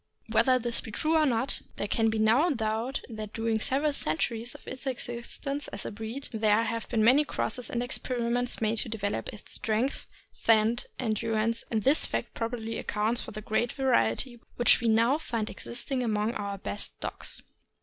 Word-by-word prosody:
Whether 235 +3 +5
this 240 -1 +1
be - - -9
true 310 +9 +1
or 310 -1 +5
not, 245 +1 0
there - - -2
can 225 +2 +2
be 220 - -1
no 225 +10 +4
doubt 225 +1 -1
that 215 -3 -7
during 225 -1 0
the - - -2
several 285 +2 +2
centuries 230 - -1
of - - -14
its 260 +1 -6
existence 260 +3 -3
as 200 - -6
a - - -3
breed 225 +6 -5
there 215 0 +3
have 230 0 -3
been 225 -3 +2
many 260 +7 +6
crosses 250 -4 -2
and 240 0 -1
experiments 245 -1 0
made 220 +1 +1
to 225 - -2
develop 205 -2 -2
its 210 - -10
strength, 225 +5 -1 0.3
scent, 225 +1 +3
and 220 -4 -1
endurance, 225 +1 0
and 220 -2 0
this 280 +4 +4
fact - - -3
probably 230 -1 -3
accounts 220 +3 0
for - - -7
the 215 - -6
great 220 +3 0
variety 240 - +1 0.2
which 240 +1 +5
we 235 - +1
now 230 +6 +4
find 230 -8 -3
existing 250 +2 -3
among 215 -1 0
our 200 -2 -3
best 205 +1 -5
dogs. - - -5
230 Hz, 185 wpm, -29 LUFS, 220-250 Hz, 0.3 s, many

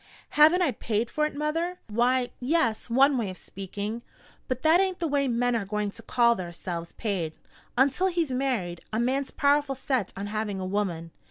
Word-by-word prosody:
"Haven't 315 +5 +6
I 305 - +2
paid 225 0 -2
for 300 0 +1
it, 305 - -10
mother?" 330 +4 -1
"Why, 245 +3 +1
yes, 250 -5 0
one 265 +2 +4
way 215 -4 -1
of 185 - -8
speaking. 205 +5 -6 0.5
But 255 0 -3
that 320 +3 +6
ain't 380 -1 +1
the 335 - -1
way 280 -2 +1
men 245 0 +1
are 225 - 0
going 210 +1 -2
to 230 - -11
call 235 +1 +3
theirselves 170 -3 -6
paid. 185 -8 -2 0.4
Until 275 +8 +3
he's 340 -6 0
married, 245 -10 -1
a 220 - -1
man's 265 +3 0
powerful 285 -1 +2
set 260 -4 -1
on 200 - -3
having 210 -1 -3
a 185 - -3
woman. 185 -4 -2
245 Hz, 185 wpm, -27 LUFS, 205-285 Hz, 0.5 s, Haven't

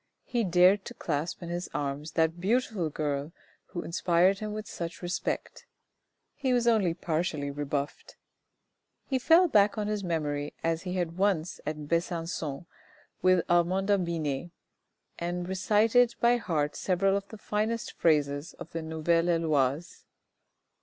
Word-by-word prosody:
He 240 -2 -1
dared 185 +2 +5
to 235 - -8
clasp 160 +1 -3
in 170 - -6
his 175 +1 -4
arms 145 +2 -3
that 165 +1 +1
beautiful 210 -4 0
girl 145 0 -2 0.4
who 175 - -5
inspired 180 +3 +2
him 215 -1 -4
with 215 0 -5
such 170 -1 -6
respect. 175 +1 -3 0.7
He 265 -3 0
was 240 -1 +2
only 210 -8 +3
partially 155 -4 -2
rebuffed. 145 0 -4 0.9
He 265 -2 0
fell 330 +7 +6
back 210 -7 +4
on 210 - -1
his 210 -1 -2
memory 150 -4 -2
as 165 0 0
he 180 0 -4
had 175 -1 -2
once 185 -4 +1
at 150 -1 -4
Besancon 165 -3 -2 0.6
with 185 -2 +4
Armanda 185 +3 +2
Binet, 160 -2 -2 0.7
and 175 +1 -3
recited 215 +5 +3
by 240 +1 +4
heart 150 -9 -1
several 195 +1 +1
of 200 0 -3
the 220 - -10
finest 215 +2 -2
phrases 145 -1 +1
out - - -23
of 165 - -8
the 165 - -3
Nouvelle 160 +2 +1
Heloise. 155 -2 0
175 Hz, 145 wpm, -29 LUFS, 160-200 Hz, 0.9 s, fell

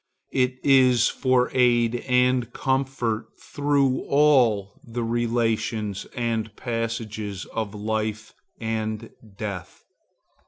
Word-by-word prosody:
It 125 -1 +1
is 130 -4 +5
for 130 -2 +1
aid 120 -2 +3
and 125 -1 +2
comfort 130 -4 -1
through 140 -2 +1
all 125 -9 +3
the 120 0 -4
relations 115 -3 -1
and 115 -3 -2
passages 115 -4 -4
of 110 -2 -3
life 110 +1 -3 0.3
and 110 0 -3 0.3
death. 100 -5 -6
115 Hz, 90 wpm, -24 LUFS, 110-125 Hz, 0.3 s, is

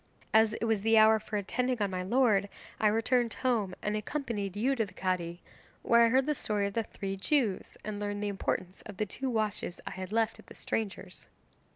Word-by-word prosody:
'As 220 0 +5
it 230 - -2
was 220 -3 +1
the 225 +1 +4
hour 220 0 +7
for 215 0 -4
attending 250 +5 -1
on 200 -2 0
my 185 -1 -2
lord 205 -1 +2 0.3
I 215 - +4
returned 230 +2 +2
home 220 -8 0
and 210 0 0
accompanied 215 -4 -3
you 260 +6 +2
to 230 - +1
the 200 - -10
Cadi, 175 -2 -2 0.4
where 235 0 +5
I 230 - +6
heard 260 +2 +3
the 300 - +1
story 210 -7 -1
of 200 - -3
the 230 - +1
three 195 -2 -5
Jews 215 -1 0
and 210 -1 -4
learned 205 0 -3
the - - 0
importance 190 -2 -3
of 205 -3 -9
the 215 - 0
two 265 +6 -4
watches 215 -6 -2
I - - -5
had 190 0 -6
left 225 0 +1
at - - -16
the - - -13
stranger's. 215 -3 -4
215 Hz, 215 wpm, -30 LUFS, 200-230 Hz, 0.4 s, hour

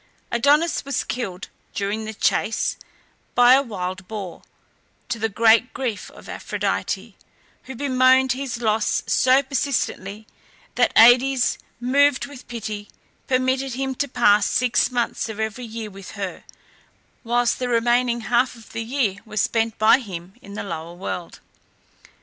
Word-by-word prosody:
Adonis 290 +7 +2
was 280 -2 -2
killed, 195 -7 -5 0.3
during 205 +2 -2
the 220 - -5
chase, 220 - 0 0.6
by 245 +1 +7
a 270 - +6
wild 185 -6 -5
boar, 200 -5 -7 0.7
to 240 -2 -3
the 225 0 0
great 225 +3 +3
grief 245 -6 -3
of - - -15
Aphrodite, - - -3 0.5
who 265 - -8
bemoaned 260 0 +3
his 260 -2 -3
loss 215 -1 +1
so 260 +2 +4
persistently 230 -6 -2 0.5
that - - +2
Aïdes, 250 +3 +5 0.2
moved 270 +2 +3
with 280 -3 -12
pity, 215 -3 -6 0.4
permitted 260 0 0
him 265 0 -2
to 285 +2 -2
pass 215 -5 +3
six 250 0 +2
months 240 -2 -2
of 220 -1 -7
every 220 +3 -3
year 220 -1 -7
with 195 -1 -11
her, 195 -3 -6 0.8
whilst 240 0 +1
the 250 -1 -2
remaining 240 0 +2
half 245 +3 +1
of 230 -2 -16
the 230 - -4
year 225 -5 -1
was 215 -1 -4
spent 225 -1 0
by 220 +4 +5
him 185 -6 -8
in 200 0 -11
the - - -4
lower 165 -2 -6
world. 175 -1 -6
235 Hz, 145 wpm, -22 LUFS, 210-255 Hz, 0.8 s, by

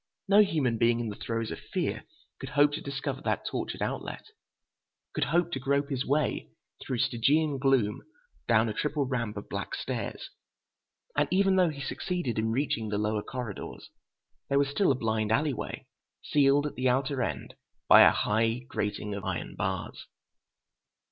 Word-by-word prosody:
No 200 +2 +7
human 135 - +1
being 120 0 +3
in 115 -2 -2
the 105 - -5
throes 115 0 -3
of - - -5
fear - - -3 0.3
could - - -6
hope 145 +2 +4
to - - -3
discover 140 -1 -4
that - - -1
tortured - - -3
outlet, - - -4 0.9
could - - 0
hope 170 0 +1
to 135 - -2
grope 140 +2 0
his 135 -1 0
way 145 +2 0 0.3
through 130 - -3
Stygian 140 +6 +2
gloom 130 -6 +2 0.5
down 115 -1 +4
a 110 - -2
triple 150 +3 -1
ramp 115 -5 -2
of 100 - -7
black - - -4
stairs. - - -4 0.8
And 145 0 +2
even 195 +1 +3
though 180 -2 +4
he 145 -3 -6
succeeded 170 - -2
in 110 +1 0
reaching 115 -3 -1
the 105 - -1
lower 105 0 0
corridors, 120 -3 -7 0.6
there 140 - +2
was 140 -1 +3
still 145 +4 +2
a - - +2
blind 110 -3 -1
alley 145 +5 +2
way, - - -6 0.4
sealed 145 0 +3
at 150 - -3
the 130 +1 +1
outer 135 +1 0
end 80 - -3 0.3
by - - +9
a - - +9
high 115 +3 +1
grating 105 0 -2
of 100 -1 -5
iron 95 -3 -4
bars.... 95 -2 -4
130 Hz, 170 wpm, -29 LUFS, 110-145 Hz, 0.9 s, by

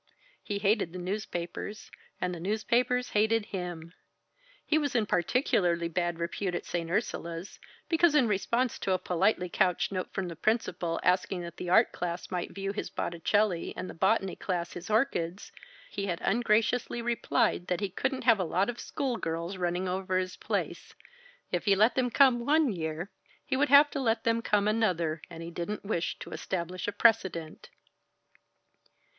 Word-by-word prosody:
He 205 - -3
hated 200 -4 +1
the - - -5
newspapers, 185 +1 -5 0.3
and 180 0 -1
the 175 - -6
newspapers 235 +6 +1
hated 220 +1 +2
him. 175 -4 -6 0.7
He 310 - +3
was 285 -4 -2
in 225 -3 +3
particularly 175 - +1
bad 175 -1 -1
repute 175 +2 -2
at - - -4
St. 170 -1 -3
Ursula's, 170 -3 -3 0.3
because, 330 -2 +4
in 260 -5 +5
response 235 +4 0
to 190 - 0
a - - +3
politely 180 +1 +1
couched 180 +1 +1
note 185 -1 -3
from 190 -2 -3
the 170 - -6
principal, 180 -4 0
asking 180 0 +1
that 170 -1 -8
the 180 - -5
art 220 +6 +5
class 175 +1 -4
might 180 -2 -2
view 195 0 -4
his 205 - -4
Botticelli 175 +2 0
and 185 - -4
the - - -7
botany 195 +1 +1
class 175 -3 -3
his 175 +3 -8
orchids, 205 -6 0 0.4
he 200 -1 -3
had 175 -2 -2
ungraciously 230 +2 +1
replied 235 -6 +1
that 180 - 0
he 200 -1 -1
couldn't 260 +7 -2
have 230 -4 +5
a - - +1
lot 185 +6 +1
of 240 - -13
school 265 -5 -2
girls 170 +1 -3
running 180 +1 -1
over 185 0 -1
his 185 0 -2
place - - -3 0.6
if - - -1
he 200 -2 +5
let 215 +5 +4
them 250 -1 +1
come 245 -1 +4
one 295 -2 +3
year, 165 +2 -4 0.3
he 265 - -1
would 285 +2 +2
have 285 +1 +7
to 285 - -3
let 225 -3 +1
them 230 0 +2
come 210 -2 +2
another, 175 -8 +1
and 165 -1 -8
he 170 - -7
didn't 175 +5 -4
wish 180 -5 -1
to - - -9
establish 180 0 -4
a - - 0
precedent. 190 -9 +1
195 Hz, 175 wpm, -29 LUFS, 175-225 Hz, 0.7 s, have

